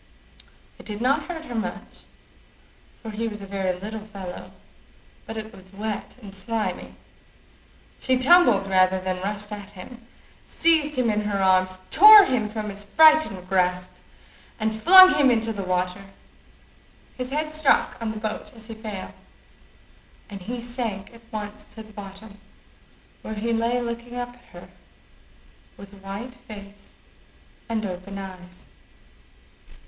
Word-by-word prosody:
It - - -13
did 210 -1 -6
not 275 +4 +1
hurt 325 -2 -7
her 245 - -8
much, 225 -1 -6 1.0
for 220 - -6
he 225 +2 -3
was 210 -1 -6
a 200 - -9
very 190 -2 -3
little 215 +2 -7
fellow, 195 -4 -9 0.8
but 225 - -7
it 220 +1 -7
was 190 0 -15
wet 210 +3 -6
and 195 -2 -10
slimy. 215 +3 -4 1.0
She 260 -1 +1
tumbled 255 - +5
rather 185 -1 +2
than 185 0 -4
rushed 205 +2 -5
at 205 -1 -8
him, 230 +5 -13 0.4
seized 315 -3 +5
him 240 -3 +2
in 210 0 0
her 205 -1 -1
arms, 185 -1 +2
tore 425 0 +10
him 230 -5 -1
from 215 -1 -5
his 200 +1 -9
frightened 310 - +4
grasp, 180 -1 0 0.7
and 220 0 -1
flung 370 +4 +9
him 285 -3 +4
into 225 -2 0
the 200 - -5
water. 185 +1 -2 1.1
His 255 -1 -5
head 305 +2 -3
struck 310 -3 +2
on 225 - -2
the 220 - -5
boat 215 0 -5
as 225 -1 -13
he 225 - -8
fell, 215 -3 -7 1.2
and 200 -1 -8
he 240 +6 -5
sank 235 -4 -5
at 230 - -16
once 210 -1 -7
to 220 - -9
the 215 0 -17
bottom, 205 +1 -11 0.8
where 220 - -6
he 230 +2 -2
lay 230 +2 0
looking 235 +1 -6
up 245 0 -4
at 245 0 -20
her - - -14 1.1
with 200 0 -13
white 200 +5 -8
face 205 -4 -14 0.7
and 220 -1 -2
open 185 +1 -7
eyes. 185 -2 -10
215 Hz, 145 wpm, -24 LUFS, 195-240 Hz, 1.2 s, tore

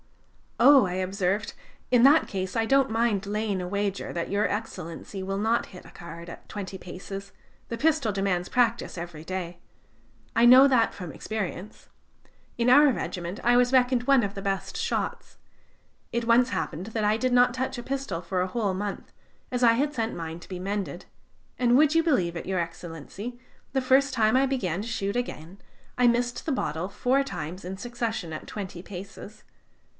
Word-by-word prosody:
"Oh!" 280 -6 +7
I 180 - -3
observed, 190 +2 -1 0.4
"in 245 -2 +5
that 290 +4 +6
case, 190 -1 -4
I 225 -1 +2
don't 270 +1 +3
mind 225 -3 +1
laying 210 -2 -1
a 180 - -4
wager 200 +1 -2
that 170 -1 -3
Your 205 +1 +2
Excellency 195 -3 -5
will 195 +1 -3
not 225 +3 +1
hit 180 - -12
the - - -14
card 170 0 -10
at - - -11
twenty 195 -2 -6
paces; 195 +2 -8 0.4
the 230 - -3
pistol 295 -4 +2
demands 195 -2 -1
practice 235 -5 +1
every 170 -2 -7
day. 175 -1 -5 0.8
I 230 - +5
know 255 +3 +9
that 250 -4 +3
from 180 -4 -7
experience. 210 +3 -6 0.7
In 240 +1 +2
our 290 +2 +7
regiment 180 -5 -4
I 240 +1 +4
was 245 +1 +3
reckoned 250 -1 +3
one 270 -1 +4
of 200 -1 -2
the 195 - -6
best 195 -1 -3
shots. - - -3 0.7
It 235 0 -1
once 240 +2 +4
happened 160 +4 -3
that 225 -1 -2
I 210 +1 +3
did 255 +1 0
not 245 0 +5
touch 260 +1 -3
a - - -7
pistol 265 -11 -3
for 180 +1 -2
a 185 - 0
whole 205 -1 -1
month, 200 +1 -5 0.4
as 250 0 -1
I 230 -1 +7
had 285 +5 0
sent 225 -4 -2
mine 165 0 -6
to - - -14
be 185 -2 -5
mended; 200 +1 -4 0.5
and 245 -1 +4
would 305 +1 +5
you 330 - +5
believe 185 - +1
it, 170 - -6
Your 190 -1 0
Excellency, 170 +7 -6 0.3
the 265 - +1
first 265 +2 +3
time 220 -1 +3
I 265 +1 +4
began 195 -10 -1
to 220 - -6
shoot 200 -3 -2
again, 195 -7 -4 0.4
I 250 -1 +5
missed 240 +4 0
a - - +1
bottle 165 - -2
four 260 +6 +1
times 180 - -6
in 190 +1 -5
succession 225 -6 -4
at 155 - -7
twenty 190 -4 -6
paces. 200 +3 -10
210 Hz, 185 wpm, -26 LUFS, 185-245 Hz, 0.8 s, know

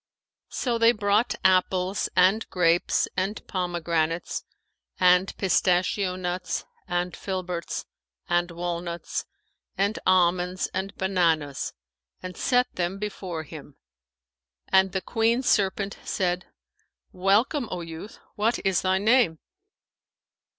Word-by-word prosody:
[FN#512] - - -11
So 240 -3 0
they 230 0 +6
brought 210 +2 +1
apples 185 +1 +2
and 190 +5 +3
grapes 175 -1 +2
and 195 +3 -2
pomegranates 170 -2 -1 0.6
and 180 0 +4
pistachio 185 0 +2
nuts 180 0 -3 0.2
and 175 0 -1
filberts 180 -3 -4 0.4
and 175 0 +1
walnuts 170 0 -4 0.5
and 200 +3 +1
almonds 180 0 +2
and 195 +1 -3
bananas 165 -7 0 0.4
and 185 0 -7
set 250 -1 +1
them 180 +2 -1
before 190 -5 -5
him, 150 -2 -11 0.9
and 190 0 +4
the 190 - -2
Queen 230 +5 +1
serpent 200 -3 +1
said, 180 -1 -1 0.6
"Welcome, 210 - +2
O 180 - -4
youth! 165 +5 -8 0.2
What 225 +3 +1
is 190 -2 +2
thy 185 0 +2
name?" 215 -4 +3
185 Hz, 110 wpm, -26 LUFS, 175-200 Hz, 0.9 s, they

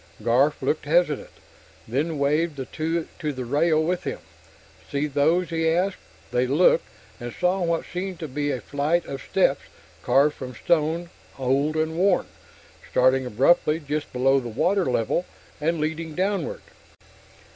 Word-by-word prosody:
Garf 130 +6 +2
looked 155 - 0
hesitant, 155 -1 +2 0.6
then 145 +7 -1
waved 150 +3 +1
the 135 -2 -5
two 165 +3 -2
to 150 - -1
the 130 -3 -5
rail 155 +5 +2
with 175 +2 -1
him. - - -3 0.7
"See 140 +1 0
those?" 155 +5 +1
he 160 0 +1
asked. 185 +4 0 0.3
They 125 +1 +1
looked, 150 +8 +4 0.3
and 120 0 -6
saw 180 +5 0
what 170 -1 0
seemed 185 0 -5
to 160 - -3
be 145 +1 -2
a 130 -4 -2
flight 150 +8 0
of 135 -1 -6
steps, - - +1 0.4
carved 145 +2 +3
from 125 -2 -8
stone, 165 +7 0 0.3
old, 135 +4 +1
and 160 0 0
worn, 190 -1 +3 0.6
starting 130 0 +3
abruptly 150 +6 +3
just 150 0 -4
below 135 +2 +3
the 120 -2 -6
water 180 - +1
level 125 +6 0 0.4
and 165 +2 0
leading 160 +1 -3
downward. 205 - -1
155 Hz, 150 wpm, -24 LUFS, 135-170 Hz, 0.7 s, looked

